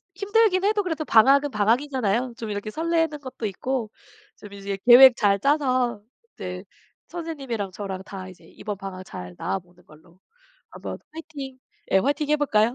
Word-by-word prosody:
힘들긴 400 -1 +2
해도 415 0 +2
그래도 320 -4 -2
방학은 275 +5 +5
방학이잖아요. 240 +1 +1
좀 225 - -6
이렇게 205 +1 -4
설레는 325 +1 0
것도 260 -4 -7
있고 230 +3 -3 0.5
좀 205 -1 -12
이제 200 0 -5
계획 250 +1 +10
잘 200 -2 +3
짜서 255 -4 +1 0.3
이제 180 0 -6 0.4
선생님이랑 275 - -5
저랑 190 -1 -6
다 190 -1 -8
이제 180 -2 -16
이번 205 +4 -7
방학 190 -1 -7
잘 90 - -9
나 - - -2
보는 180 0 -24
걸로 160 +3 -20 0.5
한번 - - -7 0.2
파이팅 290 -5 -8 0.3
예 190 - +5
파이팅 290 +5 0
해 300 - +4
볼까요? 235 -5 +2
240 Hz, 335 characters per minute, -24 LUFS, 200-290 Hz, 0.5 s, 계획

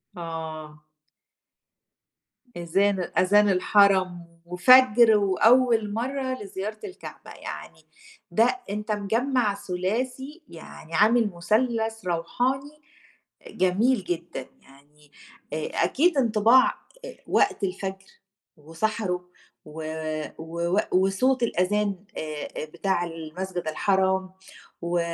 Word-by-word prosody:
آه. 160 -3 -7 1.7
إذان 185 +2 0
أذان 205 +3 +4
الحرم، 185 -2 +3 0.2
وفجر 230 +4 +6
وأول 220 +2 +3
مرّة 260 +1 -3
لزيارة 200 +2 -6
الكعبة، 380 -3 -10
يعني - - -9 0.5
ده 235 - +2
أنت 210 +2 -4
مجمَّع 220 +2 0
ثلاثي 250 - -4
يعني 165 0 -12
عامل 225 +2 +4
مثلث 225 +3 0
روحاني، 260 - -2 0.6
إ - - -13
جميل 195 +6 +1
جدًا، 170 -6 -5 0.2
يعني 145 +2 -22 0.4
آآ 155 0 -2 0.2
أكيد 295 - +2
انطباع 235 0 +5 0.4
آآ، - - -10
وقت 395 - +1
الفجر 190 0 -4 0.5
وسَحَره 180 +3 -3 0.4
و 155 +1 -9 0.6
ووق 170 +4 -2
وصوت 195 +8 +2
الأذان 205 -1 0 0.2
آآ 155 -1 -5
آآ، - - -3
بتاع 180 +3 -1
المسجد 170 +2 -6
الحرام 190 +3 +1 0.5
و 175 +1 -1
195 Hz, 95 wpm, -25 LUFS, 175-230 Hz, 1.7 s, وفجر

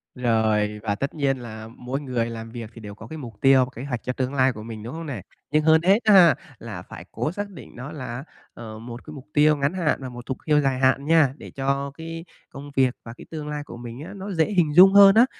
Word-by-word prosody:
Rồi, 110 -3 +1
và 105 -2 0
tất 140 +7 -3
nhiên 140 -3 0
là 110 -3 -8
mỗi 130 +3 -4
người 125 -4 -2
làm 115 -1 -7
việc 115 -2 -7
thì 115 - -12
đều 105 -1 -9
có 110 +1 -11
cái 160 - -8
mục 120 -7 -8
tiêu 135 -1 +6
và 125 - -13
kế 120 - -6
hoạch 125 -4 -4
cho 125 - -2
tương 130 +1 -2
lai 130 -1 +3
của 110 - -9
mình, 110 -1 -8
đúng 120 - -7
không 165 +1 -6
nè? 130 -9 -5 0.3
Nhưng 155 +1 +3
hơn 160 +1 +5
hết 195 +5 +4
á 215 - +5
ha, 175 -5 +8 0.2
là 105 -6 -7
phải 85 -1 -11
cố 150 - -2
xác 205 +3 -5
định 185 -8 -12
nó 125 +5 -7
là, 130 -4 -6 0.3
ờ, 110 -2 -9
một 120 +1 -9
cái 155 - -9
mục 140 -2 -10
tiêu 150 +1 +5
ngắn 140 +3 0
hạn 175 -5 0
và 130 - -5
một 120 0 -10
thục 130 - -4
tiêu 150 -2 +4
dài 135 -2 0
hạn 135 +1 +2
nha, 155 -4 +4
để - - -11
cho 140 +1 -1
cái 165 +1 -7 0.2
công 140 +1 -10
việc 130 -2 +3
và 115 - -8
cái - - -11
tương 155 -2 -5
lai 150 -1 -4
của 145 - -10
mình 120 0 -8
á, - - -9
nó 200 +1 -6
dễ 165 -4 +2
hình 170 -7 +2
dung 190 +2 +9
hơn 200 0 +9
á. 230 +2 +7
135 Hz, 275 wpm, -24 LUFS, 120-155 Hz, 0.3 s, dung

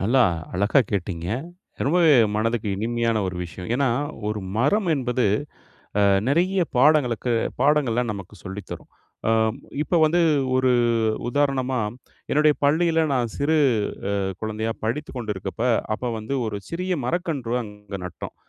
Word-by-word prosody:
நல்லா 125 +7 +3 0.3
அழகா 100 +9 +3
கேட்டீங்க, 90 -4 -3 0.6
ரொம்பவே 160 +1 +5 0.2
மனதுக்கு 110 0 0
இனிமையான 115 +2 0
ஒரு 90 -1 -4
விஷயம். 90 +2 -8
ஏன்னா, 135 +1 +2 0.4
ஒரு 105 0 -2 0.2
மரம் 185 - +2
என்பது 125 -3 0 0.8
அ - - +4 0.3
நிறைய 180 +6 +2 0.2
பாடங்களுக்கு 125 -3 +3 0.3
பாடங்கள 135 -4 +3
நமக்கு 100 -1 -9
சொல்லி 100 +1 -6
தரும். - - -8 0.4
அ - - +3 0.5
இப்போ 175 - 0
வந்து 165 +3 +3 0.4
ஒரு 130 -1 +3 0.6
உதாரணமா, 130 -1 0 0.5
என்னுடைய 150 0 +4
பள்ளியில 165 +3 +3
நான் 120 -4 -1
சிறு 155 +3 +2 0.5
அ - - 0 0.3
குழந்தையா 110 +1 -2
படித்துக் 135 +5 -3
கொண்டிருக்கப்ப 105 -2 -4 0.3
அப்ப 125 +2 -3
வந்து 110 +5 -4
ஒரு 105 -2 -3
சிறிய 180 +2 -2
மரக்கன்று 150 -7 -2
அங்க 105 -2 -11
நட்டோம். 90 - -7
125 Hz, 125 wpm, -23 LUFS, 105-150 Hz, 0.8 s, ரொம்பவே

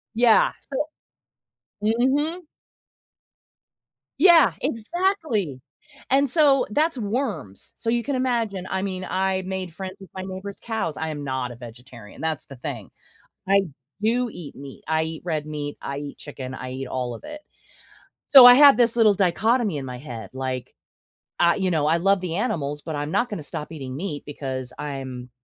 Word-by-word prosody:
Yeah 235 -1 +5 0.2
so 285 +2 0 1.0
mhm. 280 +10 +1 1.8
Yeah, 340 0 +7
exactly, 230 - -1 0.5
and 275 +1 +3
so 280 -2 +4
that's 310 +3 +1
worms, 210 - -4
so 230 - -3
you 235 0 +1
can 285 - -2
imagine 230 -7 -1
I 190 - -1
mean, 185 -1 -3
I 190 0 0
made 190 -2 -4
friends 190 0 -6
with 195 - -13
my 190 - -4
neighbor's 190 +1 -7
cows 220 -9 -3
I 160 0 -3
am 145 -2 -5
not 130 -2 -2
a - - -9
vegetarian, 120 -2 -12
that's 160 -2 -2
the 135 - -11
thing. 125 - -7 0.6
I 195 0 +5 0.4
do 240 +3 +2
eat 165 -8 -9
meat. 140 -1 -10
I 160 0 +2
eat 160 0 -6
red 155 -3 -2
meat, 150 -1 -5
I 140 0 -4
eat 145 0 -7
chicken, 130 -3 -7
I 130 0 -6
eat 135 +1 -5
all 125 -2 -3
of - - -11
it. 300 0 -8 0.9
So, 270 -3 +10
I 245 - +11
have 285 +1 +8
this 235 -1 +3
little 220 -3 +5
dichotomy 210 +2 +2
in 135 - -5
my 125 -1 -6
head 120 -6 -8
like, 130 -1 -4 0.7
I 170 0 +5
you 190 -2 0
know, 155 -3 +1
I 160 +2 +3
love 195 +2 +2
the 175 -3 -3
animals, 150 - -2
but 160 -2 -4
I'm 145 +1 -3
not 245 +6 +1
gonna 190 -7 -5
stop 150 +1 -6
eating 135 -5 -6
meat 150 -3 -4
because 130 -3 -5
I'm, 130 -3 -6
185 Hz, 170 wpm, -24 LUFS, 140-235 Hz, 1.8 s, I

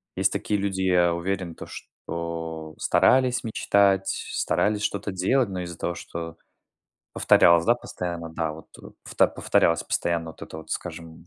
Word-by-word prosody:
есть - - +2
такие 105 - -1
люди, 95 -1 -2
я 90 -2 +3
уверен, 90 0 -3
то - - -9
что 80 -2 -6
старались 130 -1 +3
мечтать, 100 -3 +2
старались 105 0 0
что-то 100 0 -2
делать, 100 +6 +1
но 90 -1 -4
из-за 85 -1 -7
того, 85 - -3
что 85 -1 -7 0.8
повторялось, 85 -1 +5
да, 120 - +4
постоянно 85 -7 -5
да, 80 -1 -2
вот, 80 0 -12
э, - - -12 0.3
повт - - +4
повторялась 85 0 +2
постоянно 85 -1 -1
вот 80 - -11
это 80 - -8
вот, 80 - -12
скажем, 80 -1 -6
85 Hz, 155 wpm, -25 LUFS, 85-95 Hz, 0.8 s, повторялось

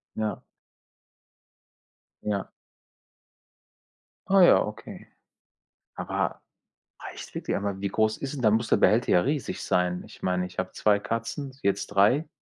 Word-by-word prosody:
Ja. 110 -3 -2 1.8
Ja. 100 -2 -2 1.8
Ah 195 0 +5
ja, 175 - +6
okay. 105 +1 -9 0.9
Aber - - -3 0.6
reicht - - -9
wirklich? - - -3
Aber 100 -1 -3
wie 100 - -1
groß 110 +2 +1
ist 135 0 -5
denn 140 - -5
dann 110 -2 +4
muss 115 +1 -1
der - - +3
Behälter 115 +3 +3
ja 90 - +5
riesig 145 0 -2
sein. 90 0 0
Ich - - -15
meine, 90 0 0
ich 90 - -8
habe - - -2
2 105 -1 +2
Katzen, 115 +5 -4
jetzt 100 - 0
3. 105 +10 +3
105 Hz, 135 wpm, -26 LUFS, 100-125 Hz, 1.8 s, ja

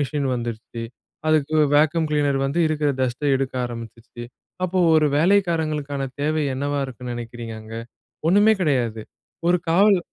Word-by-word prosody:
Machine 140 -1 -1
வந்துருச்சு 115 -1 -5 0.5
அதுக்கு 155 -1 +2 0.2
vacuum 155 +2 +3
cleaner 145 -2 +1
வந்து, 140 +5 -2
இருக்கிற 155 -1 0
டஸ்ட்ட 130 +2 -1
எடுக்க 135 0 -3
ஆரம்பிச்சுருச்சு. 115 0 -9 0.4
அப்போ 185 +1 -1 0.2
ஒரு 155 -1 +4
வேலைக்காரங்களுக்கான 155 -6 +1 0.2
தேவை 155 +2 0
என்னவா 145 +2 -2
இருக்குன்னு 125 -2 -6
நினைக்கிறீங்க 120 -1 -7
அங்க? 110 +1 -10 0.5
ஒண்ணுமே 205 +4 +5
கிடையாது. 120 -9 0 0.5
ஒரு 180 0 +4
காவல் 195 +3 +5
145 Hz, 130 wpm, -22 LUFS, 120-155 Hz, 0.5 s, ஒண்ணுமே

